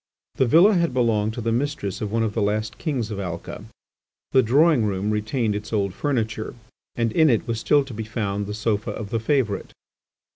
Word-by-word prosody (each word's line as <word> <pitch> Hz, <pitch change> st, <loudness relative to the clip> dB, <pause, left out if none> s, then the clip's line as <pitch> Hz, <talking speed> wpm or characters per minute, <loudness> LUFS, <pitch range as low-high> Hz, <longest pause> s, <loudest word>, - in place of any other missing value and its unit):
The 130 Hz, -, +1 dB
villa 175 Hz, -, +6 dB
had 170 Hz, -8 st, +1 dB
belonged 110 Hz, -3 st, +1 dB
to 120 Hz, -, -4 dB
the 115 Hz, 0 st, -1 dB
mistress 120 Hz, -6 st, -2 dB
of 105 Hz, -2 st, -3 dB
one 115 Hz, 0 st, +1 dB
of 110 Hz, -2 st, -1 dB
the 110 Hz, -, -1 dB
last 105 Hz, +1 st, -1 dB
Kings 130 Hz, -9 st, -2 dB
of 100 Hz, -, -4 dB
Alca: 85 Hz, -4 st, -6 dB, 0.7 s
the 130 Hz, -, +5 dB
drawing 140 Hz, +2 st, +4 dB
room 100 Hz, 0 st, -1 dB
retained 110 Hz, +1 st, 0 dB
its 105 Hz, +2 st, -6 dB
old 100 Hz, -4 st, 0 dB
furniture, 110 Hz, -6 st, -2 dB, 0.4 s
and 115 Hz, -1 st, 0 dB
in 160 Hz, +5 st, +4 dB
it 115 Hz, -4 st, +1 dB
was 115 Hz, -1 st, -2 dB
still 145 Hz, +3 st, +3 dB
to 135 Hz, -, -9 dB
be 110 Hz, +1 st, -4 dB
found 105 Hz, -2 st, -3 dB
the 105 Hz, -, -4 dB
Sofa 110 Hz, -1 st, -1 dB
of 105 Hz, -3 st, -6 dB
the 115 Hz, -, 0 dB
Favourite. 115 Hz, -3 st, -1 dB
110 Hz, 205 wpm, -23 LUFS, 105-130 Hz, 0.7 s, villa